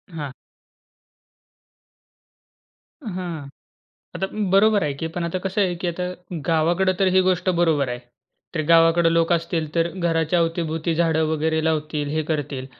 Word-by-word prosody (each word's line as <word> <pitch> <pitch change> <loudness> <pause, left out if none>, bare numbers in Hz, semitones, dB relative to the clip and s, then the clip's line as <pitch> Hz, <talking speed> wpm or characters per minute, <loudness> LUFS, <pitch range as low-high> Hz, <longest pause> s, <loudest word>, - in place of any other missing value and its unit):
हां. 145 -4 -5 2.7
हां. 175 -7 -5 0.7
आता 190 - -1 0.2
बरोबर 205 +2 +4
आहे 150 -2 0
की. 160 - -2
पण 170 +1 -4
आता 170 +2 -2
कसं 190 +3 -2
आहे 180 -2 0
की - - -2
आता 175 +1 -3 0.4
गावाकडं 170 +4 +2
तर 195 - +3
ही 185 - +7
गोष्ट 185 0 0
बरोबर 155 -6 +2
आहे. 120 - -3 0.6
तर 155 - 0
गावाकडं 165 0 +5
लोक 165 +1 +2
असतील 165 -1 0
तर 165 0 +2
घराच्या 170 -1 +1
अवती-भोवती 165 -1 -1
झाडं 160 -1 +2
वगैरे 160 0 0
लावतील, 155 -2 -1
हे 155 +1 0
करतील. 140 -4 -3
165 Hz, 140 wpm, -22 LUFS, 155-180 Hz, 2.7 s, ही